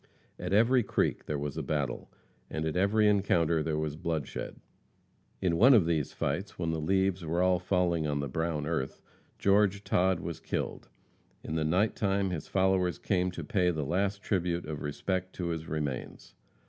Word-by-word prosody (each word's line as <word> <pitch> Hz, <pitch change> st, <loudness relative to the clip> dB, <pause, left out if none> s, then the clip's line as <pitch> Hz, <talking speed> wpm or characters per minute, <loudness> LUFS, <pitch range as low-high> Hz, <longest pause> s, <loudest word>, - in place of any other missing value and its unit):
At -, -, -4 dB
every 120 Hz, +5 st, +5 dB
creek 105 Hz, -, -1 dB
there 75 Hz, -, -1 dB
was 70 Hz, 0 st, -4 dB
a -, -, -1 dB
battle, 70 Hz, -5 st, -2 dB, 0.4 s
and 80 Hz, 0 st, -3 dB
at 80 Hz, -, -2 dB
every 105 Hz, +3 st, +3 dB
encounter 85 Hz, -6 st, +2 dB
there 75 Hz, 0 st, -1 dB
was 75 Hz, -1 st, -2 dB
bloodshed. 80 Hz, -2 st, -4 dB, 0.9 s
In 85 Hz, -3 st, +2 dB
one 130 Hz, +7 st, +7 dB
of 100 Hz, -7 st, +5 dB
these 80 Hz, -4 st, 0 dB
fights, 90 Hz, +9 st, -3 dB
when 85 Hz, -2 st, -1 dB
the 80 Hz, -, -2 dB
leaves 95 Hz, +2 st, +1 dB
were 85 Hz, +3 st, 0 dB
all 90 Hz, -1 st, +3 dB
falling 90 Hz, -4 st, +1 dB
on 70 Hz, -1 st, -1 dB
the 70 Hz, -, -2 dB
brown 80 Hz, +2 st, -2 dB
earth, 80 Hz, -4 st, -2 dB, 0.4 s
George 100 Hz, 0 st, +3 dB
Todd 95 Hz, -2 st, +2 dB
was 85 Hz, -1 st, -5 dB
killed. -, -, -4 dB, 0.5 s
In -, -, -5 dB
the 80 Hz, -1 st, 0 dB
night 90 Hz, +8 st, +2 dB
time 100 Hz, -2 st, 0 dB
his 80 Hz, -4 st, -4 dB
followers 95 Hz, -2 st, +2 dB
came 90 Hz, -2 st, 0 dB
to 90 Hz, -, -6 dB
pay 90 Hz, -4 st, +1 dB
the 80 Hz, -4 st, -1 dB
last 100 Hz, +5 st, -1 dB
tribute 90 Hz, -3 st, -1 dB
of 75 Hz, -1 st, -5 dB
respect 95 Hz, +5 st, -2 dB
to 85 Hz, -2 st, -3 dB
his 80 Hz, -1 st, -4 dB
remains. 75 Hz, -4 st, -4 dB
85 Hz, 180 wpm, -30 LUFS, 80-95 Hz, 0.9 s, one